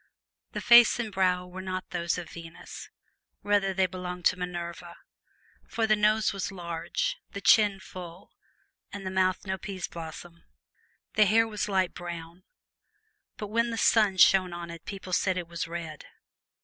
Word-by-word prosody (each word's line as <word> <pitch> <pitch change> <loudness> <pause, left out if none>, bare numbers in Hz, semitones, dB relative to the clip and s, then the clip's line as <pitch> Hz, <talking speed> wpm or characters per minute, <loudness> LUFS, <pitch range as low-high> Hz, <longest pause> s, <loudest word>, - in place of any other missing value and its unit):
The - - -3
face 240 -1 +7
and 225 -3 -3
brow 180 -1 +1
were 180 +1 -8
not 185 0 -5
those 170 -1 -1
of 175 -3 -7
Venus 165 0 -10 0.5
rather 205 -1 +2
they 190 0 +2
belonged 180 -1 -6
to - - +5
Minerva; 175 -1 -6 0.7
for 225 0 0
the 215 -1 +4
nose 215 0 +2
was 195 0 -3
large, 180 - -3 0.2
the 200 - -4
chin 205 -1 +4
full, 180 -1 -10 0.6
and 200 -1 -7
the 185 - -3
mouth 185 0 +1
no 190 -1 -3
pea's 190 -2 -5
blossom. 165 +1 -9 0.7
The 215 - +5
hair 225 +3 +4
was 210 -1 -3
light 190 -2 +1
brown, 170 0 -8 1.0
but 210 - -6
when 230 +2 +1
the 230 - -3
sun 210 -4 +3
shone 185 -1 +5
on 170 -1 -6
it 170 -1 -11
people 195 -2 -7
said 185 +1 +1
it 175 -2 -4
was 170 -1 -4
red. 165 -3 -6
185 Hz, 160 wpm, -28 LUFS, 175-205 Hz, 1.0 s, face